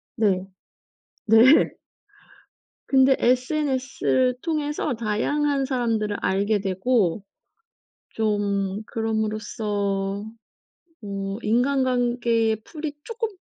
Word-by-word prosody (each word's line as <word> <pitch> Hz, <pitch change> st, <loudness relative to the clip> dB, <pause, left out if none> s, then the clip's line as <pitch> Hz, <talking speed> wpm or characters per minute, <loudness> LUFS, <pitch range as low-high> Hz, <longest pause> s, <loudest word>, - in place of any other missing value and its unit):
네. 190 Hz, -4 st, +1 dB, 0.8 s
네. 230 Hz, +6 st, +6 dB, 1.1 s
근데 265 Hz, 0 st, +5 dB
SNS를 260 Hz, -1 st, +1 dB
통해서 300 Hz, -3 st, -2 dB
다양한 275 Hz, +6 st, 0 dB
사람들을 230 Hz, -6 st, -1 dB
알게 205 Hz, +2 st, +1 dB
되고 195 Hz, 0 st, 0 dB, 0.9 s
좀 205 Hz, -2 st, -1 dB
그럼으로써 210 Hz, -3 st, -2 dB, 0.8 s
뭐 195 Hz, -1 st, -5 dB
인간관계의 240 Hz, -2 st, +1 dB
풀이 305 Hz, -2 st, -6 dB
쪼끔 460 Hz, 0 st, -3 dB
225 Hz, 170 characters per minute, -24 LUFS, 205-260 Hz, 1.1 s, 네